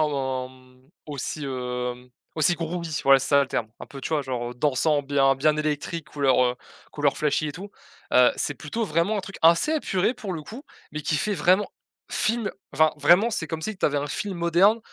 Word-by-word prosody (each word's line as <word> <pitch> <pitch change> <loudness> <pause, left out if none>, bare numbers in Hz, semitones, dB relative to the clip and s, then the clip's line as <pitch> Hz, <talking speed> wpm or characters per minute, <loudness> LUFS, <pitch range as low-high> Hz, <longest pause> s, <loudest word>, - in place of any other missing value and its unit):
en, 130 -2 -2
mmh, 130 0 -21 0.2
aussi, 145 +1 -5
heu, 125 -1 -4 0.3
aussi 160 +3 +3
groovy 165 -1 -4
voilà 135 0 +6
c'est 135 - -4
ça 140 -1 +5
le 135 - -4
terme. 110 - -2
Un - - -8
peu 135 - -10
tu 135 - -5
vois 150 -3 +1
genre, 120 -2 -4
heu, - - -17
dansant 145 +3 +1
bien 135 -1 +3
bien 150 +3 +2
électrique 150 +1 -3
couleur, 140 -4 +2
heu, 125 0 +1 0.4
couleur 145 -2 +1
flashy 150 0 0
et - - -5
tout, 190 +7 -9 0.4
heu, 125 0 +6
c'est 145 - -1
plutôt 155 - -4
vraiment 170 +4 0
un - - -1
truc 195 +1 -9
assez 170 - +5
épuré 225 - 0
pour 220 -6 -6
le 160 -3 -5
coup, 235 - -10 0.3
mais 155 - -4
qui 155 +1 0
fait 210 +5 0
vraiment, 185 +4 +3 0.4
film, 225 -2 0 0.2
enfin 155 +3 +3
vraiment 175 +10 +4
c'est 165 - -2
comme 160 0 -5
si 220 +4 -3
que - - -23
tu - - +3
avais 145 -1 0
un 145 - -3
film 195 +5 -4
moderne, 175 +6 +4
150 Hz, 215 wpm, -25 LUFS, 135-175 Hz, 0.4 s, voilà